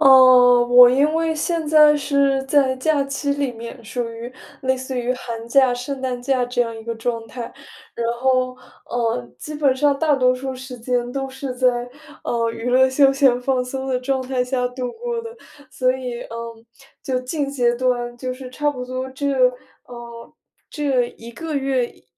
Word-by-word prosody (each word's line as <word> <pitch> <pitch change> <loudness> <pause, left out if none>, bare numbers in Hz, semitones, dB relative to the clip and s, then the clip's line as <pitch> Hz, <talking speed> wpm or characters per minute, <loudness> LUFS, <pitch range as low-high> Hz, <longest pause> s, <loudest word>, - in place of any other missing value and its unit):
呃， 255 -3 +7
我 245 0 +8
因 285 +5 +2
为 325 0 +1
现 325 0 -2
在 300 -1 +6
是 280 -2 +1
在 270 -1 +3
假 290 +2 +1
期 280 +1 -2
里 280 -3 -2
面， 235 +2 -9
属 235 +1 -4
于 230 +2 -8 0.3
类 260 0 +1
似 260 0 -5
于 245 +1 0
寒 230 -3 -7
假、 260 0 +4
圣 260 +2 -5
诞 250 -2 -2
假 255 0 +1
这 245 0 -2
样 230 -1 -5
一 225 - -9
个 230 +1 -4
状 230 0 -3
态。 250 - -9 0.5
然 235 - -3 0.2
后， 255 -1 +1 0.3
呃， 230 - -1 0.2
基 300 - -7
本 285 -3 +2
上 285 +1 +2
大 300 -1 +2
多 255 -1 +3
数 265 +1 -5
时 255 0 -9
间 245 0 -1
都 270 -1 -3
是 265 -1 -6
在， 245 -1 +1 0.4
呃， 230 -1 0
娱 230 +2 -5
乐 260 +1 +4
休 270 0 +5
闲 270 -3 +3
放 255 0 0
松 265 +1 -5
的 255 -1 0
状 265 +1 -1
态 255 -1 -1
下 250 -1 -1
度 250 0 -4
过 475 0 -4
的。 460 - -7 0.4
所 255 -1 +1
以， 250 -2 -5
嗯， 230 0 -8 0.4
就 255 -2 -1
近 275 +2 -3
阶 245 -3 +1
段， 240 -1 -1
就 255 0 -4
是 255 -1 -10
差 295 +3 -1
不 250 -3 -6
多 255 +1 -4
这， 280 +2 -4 0.6
呃， 235 -1 -11 0.4
这 270 -5 0
一 230 +1 -10
个 315 +5 -6
月， 270 -3 0
以 - - -22
255 Hz, 205 characters per minute, -21 LUFS, 245-275 Hz, 0.6 s, 我